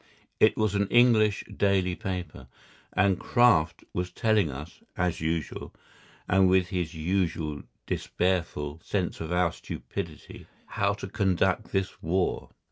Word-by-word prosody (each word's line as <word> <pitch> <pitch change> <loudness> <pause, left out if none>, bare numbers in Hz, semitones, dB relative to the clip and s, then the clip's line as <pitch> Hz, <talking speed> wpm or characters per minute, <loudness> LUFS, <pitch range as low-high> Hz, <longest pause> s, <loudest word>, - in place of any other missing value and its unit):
It 110 - +5
was 110 -2 +1
an 100 -1 +1
English 110 -4 +4
daily 95 -2 +2
paper, 90 - -5 0.4
and 95 -1 +2
Kraft 120 -11 +3
was 90 0 -2
telling 110 -7 +2
us, 75 +5 -8 0.2
as 90 -2 0
usual, 80 -1 -3 0.6
and 95 0 +4
with 95 -1 +3
his 90 -3 -3
usual 80 -3 -1 0.2
despairful 85 -5 -1
sense 95 -4 -2
of 80 +1 -5
our 90 -1 +2
stupidity, - - -7 0.2
how 100 0 0
to 100 - -7
conduct 95 -2 0
this 95 -1 -2
war. 90 +3 -1
90 Hz, 125 wpm, -27 LUFS, 85-100 Hz, 0.6 s, It